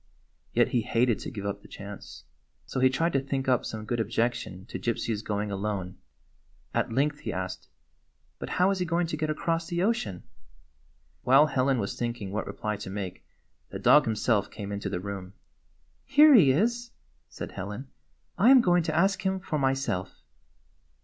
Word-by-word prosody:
Yet - - +3
he 120 - +1
hated 115 +1 +1
to - - -6
give 100 -2 -7
up 100 0 -3
the - - -15
chance. 100 0 -10 0.4
So 130 - -4
he 130 0 +5
tried 165 +6 0
to 135 - +3
think 135 0 -3
up 125 -3 +3
some 110 -1 -6
good 120 +2 -2
objection 115 -5 -2
to - - -6
Gypsy's 115 0 -2
going 105 -1 -2
alone. 95 -2 -3 0.8
At - - 0
length 145 +5 +1
he - - -4
asked: 95 0 -5 0.4
" 65 0 -43
But - - -6
how 185 +2 +4
is 195 - -1
he 180 - 0
going 170 +1 +1
to 160 - -3
get 155 0 -2
across 165 +2 -1
the 175 0 -1
ocean?" 110 - -1 1.0
While 135 +4 +6
Helen 135 -2 +1
was 100 -3 -3
thinking 120 -5 -3
what 105 +2 -3
reply 105 -1 -3
to 100 -1 -7
make 95 -2 -5 0.5
the - - -6
dog - - +5
himself 110 -2 +1
came 100 -1 -7
into 100 0 -3
the 90 - -3
room. 95 -1 -6 0.7
"Here 295 +3 +7
he 170 - +7
is," 235 - 0 0.4
said - - -7
Helen. 105 +8 -6 0.5
"I 215 +7 +6
am 265 -1 +9
going 175 -4 +3
to 160 - -2
ask 195 +3 +2
him 190 0 0
for 155 -4 -3
myself." 135 -9 -1
120 Hz, 185 wpm, -27 LUFS, 100-160 Hz, 1.0 s, am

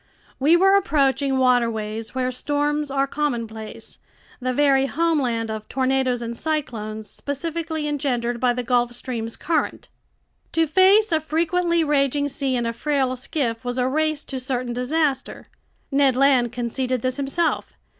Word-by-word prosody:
We 305 +6 +5
were 385 +2 +5
approaching 280 -7 +2
waterways 230 -3 0
where 255 -1 0
storms 290 +3 -1
are 275 0 +1
commonplace, 230 -7 -4 0.4
the 255 0 -1
very 275 0 +3
homeland 265 -8 0
of 215 -1 -6
tornadoes 260 -2 0
and 235 0 -4
cyclones 220 -8 -3
specifically 315 +3 -4
engendered 245 -5 -1
by 245 0 +2
the 250 0 -3
Gulf 245 0 +1
Stream's 235 -2 -4
current. 325 0 -2 0.6
To 330 0 +3
face 380 +6 +5
a 320 - +3
frequently 335 +2 +1
raging 285 -1 +1
sea 270 -1 -1
in 240 -1 -1
a 230 - -1
frail 270 -1 0
skiff 250 -3 -3
was 245 0 -3
a 250 0 +1
race 310 +2 0
to 265 - -5
certain 250 -1 -2
disaster. 270 +2 -1 0.4
Ned 275 -2 +3
Land 260 -3 +3
conceded 250 +1 -2
this 255 +1 -1
himself. 285 +4 -1
265 Hz, 145 wpm, -23 LUFS, 245-300 Hz, 0.6 s, We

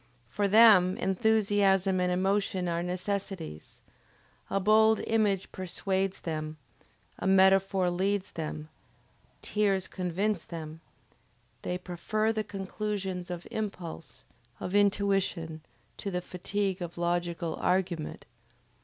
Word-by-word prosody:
For 205 0 0
them 200 -4 +7
enthusiasm 195 -2 +2
and 180 0 +1
emotion 190 0 0
are 170 0 -1
necessities. 180 - -4 0.7
A 195 - +1
bold 220 +2 +5
image 210 -4 +1
persuades 190 +1 -2
them, 155 -1 -4 0.6
a - - -2
metaphor 190 0 +4
leads 195 +2 -1
them, 155 -1 -5 0.7
tears 195 -3 +1
convince 185 +1 -1
them, 160 -1 -8 0.8
they 180 - -2
prefer 200 +5 -1
the 215 -1 -1
conclusions 195 -2 -4
of 175 -1 -5
impulse, 185 -7 -6 0.3
of 180 - -5
intuition, 195 -5 +1 0.4
to 200 - -4
the 180 -2 -2
fatigue 190 +1 -2
of 175 -1 -6
logical 170 -1 -1
argument. 180 -4 -1
190 Hz, 105 wpm, -29 LUFS, 175-200 Hz, 0.8 s, them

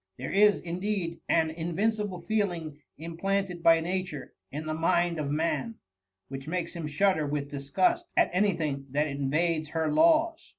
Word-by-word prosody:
There 130 - -5
is 205 +1 +5
indeed 175 0 -3
an 160 -1 +3
in* 165 +1 -4
▼incible 210 -2 -1
feeling 175 -9 -1 0.2
implanted 180 +3 -2
by 165 0 +5
Nature 175 -4 -4 0.2
in 150 +3 -5
the 155 - -2
mind 170 +1 +1
oi 150 - -1
man, 165 +10 -1 0.5
which 135 +1 -8
makes 170 0 -3
him 165 -3 -4
shudder 160 0 +1
with 145 0 -3
disgust 335 - 0
at - - +4
any 200 +2 +3
thing 140 -4 -3
that 150 +2 +2
invades 155 +3 0
her 160 0 -1
laws. 325 - +3
170 Hz, 160 wpm, -28 LUFS, 150-195 Hz, 0.5 s, is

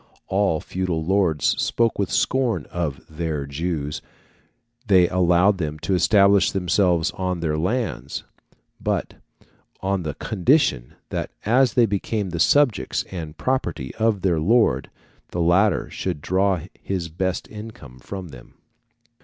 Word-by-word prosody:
All 95 -5 +1
feudal 90 -3 -3
lords 90 -5 +2
spoke 115 -2 +1
with 100 - 0
scorn 120 - +1
of 85 -6 -3
their 80 -2 -3
Jews; 75 0 -3 0.9
they 95 -3 +5
allowed 90 +2 +3
them 75 -2 -3
to 95 - -2
establish 100 +2 +4
themselves 90 -2 +1
on 90 -1 -3
their 80 -2 -1
lands, 110 +9 -2 0.6
but - - -1 0.7
on 95 0 -1
the 75 -4 -4
condition 105 - +1
that - - -3 0.2
as 125 +2 +3
they 120 - +5
became 100 -1 -2
the 85 - -4
subjects 145 - +3
and 80 -4 -6
property 85 - -2
of 110 -4 0
their 90 -4 +2
lord, 85 - +2 0.4
the 90 - -4
latter 85 +2 +3
should 90 -5 -3
draw 95 +2 +1 0.2
his 90 -4 -3
best 90 +3 -2
income 105 - -10
from 95 +5 -7
them. 65 -4 -14
90 Hz, 130 wpm, -23 LUFS, 80-100 Hz, 0.9 s, they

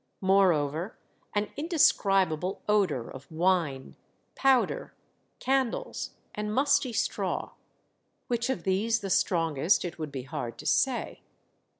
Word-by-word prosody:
Moreover, 180 -3 +2 0.4
an 205 0 0
indescribable 195 - +2
odor 190 - +1
of 130 +2 -11
wine, 160 -5 0 0.4
powder, 270 - +1 0.4
candles, 270 - -1 0.2
and 210 0 -3
musty 265 +1 +2
straw; 225 - -2 0.7
which 240 0 -1
of 225 -10 -2
these 200 +4 +1
the 195 -2 -4
strongest, 165 -2 +2
it 170 -1 -6
would 155 -2 -4
be 135 -2 -5
hard 125 -2 -5
to - - -10
say. - - 0
190 Hz, 110 wpm, -28 LUFS, 160-230 Hz, 0.7 s, Moreover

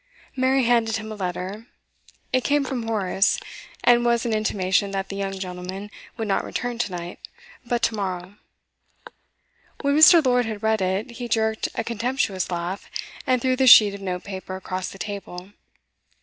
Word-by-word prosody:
Mary 260 0 +2
handed 230 -2 +2
him 220 0 -5
a - - -5
letter; 190 +3 -5 0.7
it 255 -1 +2
came 290 -1 +2
from 245 -4 -4
Horace, 200 -3 +1 0.4
and 240 0 +5
was 235 -1 +2
an 230 - 0
intimation 200 -2 +1
that 195 0 -3
the 195 - -5
young 195 -1 -3
gentleman 185 +2 -6 0.3
would 225 - -3
not 195 - +1
return 245 -1 -4
to 205 - -1
night, 175 0 -6 0.4
but 240 -1 -2
to 230 - +2
morrow. 185 -2 -4 1.5
When 280 0 +1
Mr. 315 0 +8
Lord 245 -2 +3
had 215 -1 -6
read 220 -1 +2
it, 190 +5 -1
he 240 0 -6
jerked 220 -1 0
a 230 - -1
contemptuous 230 -4 -1
laugh, 175 +2 -4 0.4
and 255 -2 +2
threw 260 -1 +2
the 260 0 +2
sheet 210 -4 +9
of 200 - -8
note 180 -2 -4
paper 190 -1 -6
across 185 0 -4
the - - -11
table. 195 -2 -7
215 Hz, 170 wpm, -23 LUFS, 190-240 Hz, 1.5 s, sheet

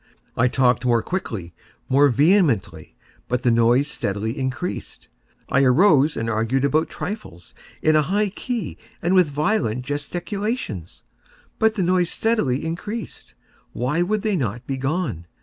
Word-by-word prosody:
I 125 - +3
talked 125 -1 +2
more 120 -2 +2
quickly—more 130 - -1
vehemently; 135 - +2 0.3
but 125 +1 -1
the 120 - +3
noise 120 +4 +3
steadily 110 -4 -2
increased. 135 +6 -4 0.4
I 135 - +3
arose 150 +2 +4
and 115 +1 -2
argued 115 +5 0
about 155 +3 +1
trifles, 155 - -7 0.3
in 155 0 +4
a 155 - +5
high 205 +7 0
key 225 0 -5 0.2
and 175 +3 +2
with 180 -5 +5
violent 145 - 0
gesticulations; 170 - -4 0.6
but 220 0 +3
the 195 - 0
noise 180 -1 +2
steadily 190 - 0
increased. 205 +7 -6 0.4
Why 130 +8 0
would 205 +3 0
they 215 -2 +1
not 120 - -3
be 135 - -3
gone? 135 - -2
145 Hz, 135 wpm, -22 LUFS, 120-185 Hz, 0.6 s, a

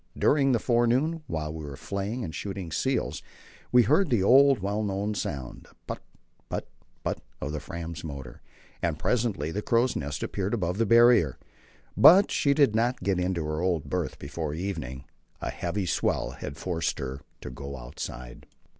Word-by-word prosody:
During 140 -2 +4
the 120 - +4
forenoon, 125 +8 +2
while 75 -1 -3
we 80 -1 -6
were 70 -2 -6
flaying 100 +8 -3
and 80 - -5
shooting 95 +2 -5
seals, 75 - -1 0.5
we 125 -1 +7
heard 155 - +3
the 115 -6 +2
old, 135 +5 +6
well 100 +1 -2
known 100 0 -1
sound 70 -10 -5 0.2
put, - - -5 0.5
put, - - -3 0.4
put - - -2 0.2
of 70 - -3
the 75 - -3
Fram's 85 +1 -6
motor, 70 -5 -8 0.4
and 85 -3 0
presently 105 - 0
the 105 - -2
crow's 120 +3 +2
nest 75 +1 -3
appeared 100 +3 -1
above 90 -2 -2
the 115 - +2
Barrier. 115 - +6 0.6
But 190 +4 +8
she 140 -1 +2
did 140 -7 +4
not 120 -1 +1
get 95 -1 +1
into 90 -3 -1
her 75 +1 -2
old 90 -4 -1
berth - - -2
before 75 +1 -4
evening. 80 -8 -4 0.4
A - - -3
heavy 90 +3 -2
swell - - 0
had 70 - -7
forced 85 -3 -2
her 65 +1 -5 0.2
to - - -7
go 70 +2 -7
outside. 60 -1 -8
95 Hz, 170 wpm, -27 LUFS, 75-115 Hz, 0.6 s, But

